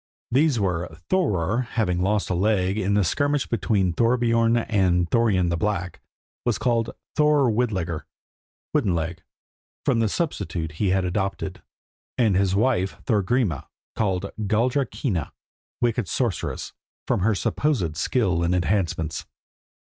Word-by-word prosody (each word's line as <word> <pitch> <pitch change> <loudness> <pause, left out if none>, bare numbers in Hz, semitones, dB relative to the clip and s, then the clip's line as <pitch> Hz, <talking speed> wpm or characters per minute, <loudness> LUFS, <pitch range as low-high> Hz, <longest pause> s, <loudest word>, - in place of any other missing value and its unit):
These 135 0 +3
were 90 -3 0 0.2
Thorer, 105 - +1
who, 130 - +1
having 90 -6 +1
lost 100 +1 +1
a - - +3
leg 95 0 +1
in 100 -1 0
the 105 - +3
skirmish 145 - +1
between 95 -4 +1
Thorbiorn 115 +1 +3
and 95 -6 +2
Thorarin 100 -5 +2
the 85 - 0
Black, 90 -2 -2 0.4
was 120 -3 +1
called 115 -2 +1 0.3
Thorer 150 -4 +4
Widlegr 95 -8 -1 0.7
(wooden 90 -4 +2
leg), 80 0 -3 0.6
from 115 - +2
the 110 -2 +2
substitute 100 - -2
he 95 +6 -1
had 95 0 +2
adopted; 95 +2 -2 0.6
and 110 -6 +3
his 95 0 +2
wife, 105 -4 +1
Thorgrima, 105 - +1 0.3
called 100 -2 -1
Galldra 120 +6 +1
Kinna 90 - -2 0.5
(wicked 120 -3 +1
sorceress), 120 -3 -2 0.3
from - - +1
her 105 +3 +2
supposed 100 - 0
skill 90 - +1
in 85 +1 +2
enchantments. 85 -3 -1
100 Hz, 135 wpm, -24 LUFS, 90-120 Hz, 0.7 s, Thorer